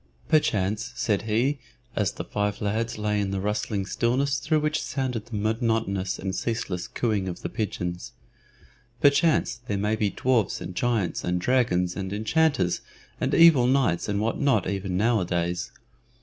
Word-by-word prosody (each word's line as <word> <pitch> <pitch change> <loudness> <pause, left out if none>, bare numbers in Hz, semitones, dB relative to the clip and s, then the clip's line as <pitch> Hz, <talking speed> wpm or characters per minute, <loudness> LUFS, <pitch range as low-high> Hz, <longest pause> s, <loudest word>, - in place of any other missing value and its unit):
"Perchance," 110 -5 +1
said 105 -5 0
he, 130 +7 +1 0.4
as 105 -2 0
the - - -5
five 105 0 -2
lads 110 +3 -1
lay 105 -1 0
in 100 - -1
the 95 0 -2
rustling 105 0 -1
stillness 130 +5 0
through 155 +6 +1
which 150 0 0
sounded 125 -5 -3
the 120 - -6
monotonous 110 -3 0
and 95 0 -4
ceaseless 95 -5 -2
cooing 105 -5 -1
of 90 - -6
the - - -2
pigeons 90 -5 -4 0.9
"perchance 145 -4 +3
there 100 - -1
may 105 +2 +1
be 105 -2 +1
dwarfs 120 -3 +1
and 90 - -6
giants 115 -4 0
and 90 0 0
dragons 90 -6 +1
and 95 -1 -4
enchanters 110 - +1 0.4
and - - 0
evil 160 -7 +7
knights 125 -10 +2
and 100 -1 0
what 110 +2 -1
not 135 -9 +2
even 95 -1 -2
nowadays. 90 -6 0
105 Hz, 155 wpm, -26 LUFS, 95-120 Hz, 0.9 s, evil